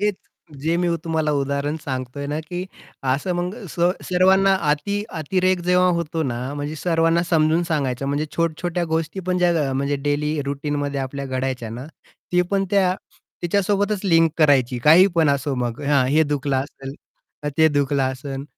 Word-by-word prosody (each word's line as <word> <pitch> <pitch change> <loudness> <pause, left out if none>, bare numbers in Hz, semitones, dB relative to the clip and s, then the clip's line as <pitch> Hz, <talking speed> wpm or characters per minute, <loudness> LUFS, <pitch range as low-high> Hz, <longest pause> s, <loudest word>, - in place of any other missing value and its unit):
हेच 205 -1 +1 0.4
जे 165 +3 0
मी 175 0 +1 0.2
तुम्हाला 160 -2 0
उदाहरण 140 +1 -1
सांगतोय 130 +1 -4
ना, 150 +2 -2
की 175 +3 -5 0.5
असं 155 +7 -1
मग 175 +2 -2
स 170 - -7 0.3
सर्वांना 190 +2 +4 0.2
अति 200 +8 -1 0.2
अतिरेक 185 +3 +1
जेव्हा 180 0 +4
होतो 165 -1 -2
ना, 120 -5 -2 0.2
म्हणजे 145 +1 -4
सर्वांना 165 0 +2
समजून 160 0 +3
सांगायचं 135 -3 -1
म्हणजे 145 +2 -1
छोट्या-छोट्या 170 +1 -1
गोष्टी 165 +4 -1
पण 180 0 +1
ज्या 175 -1 +3 0.2
अ, - - -2
म्हणजे 140 +2 0
डेली 150 +1 0
रुटीनमध्ये 145 0 -2
आपल्या 140 +1 -4
घडायच्या 130 -3 -3
ना, 125 +4 -7 0.5
ती 180 0 +4
पण 195 -1 +1
त्या 190 -2 +3 0.5
तिच्यासोबतच 200 +3 +1
लिंक 165 -3 +4
करायची. 135 -5 +3
काही 170 +6 +8
पण 165 -3 +3
असो 140 0 -1
मग 120 0 -3
हा 140 -2 +3
हे 150 +4 +3
दुखलं 145 -2 -1
असेल, 135 0 -5 0.5
का 150 - -2
ते 160 0 +6
दुखलं 140 -2 +1
असेल, 135 +1 -6
150 Hz, 165 wpm, -22 LUFS, 140-175 Hz, 0.5 s, काही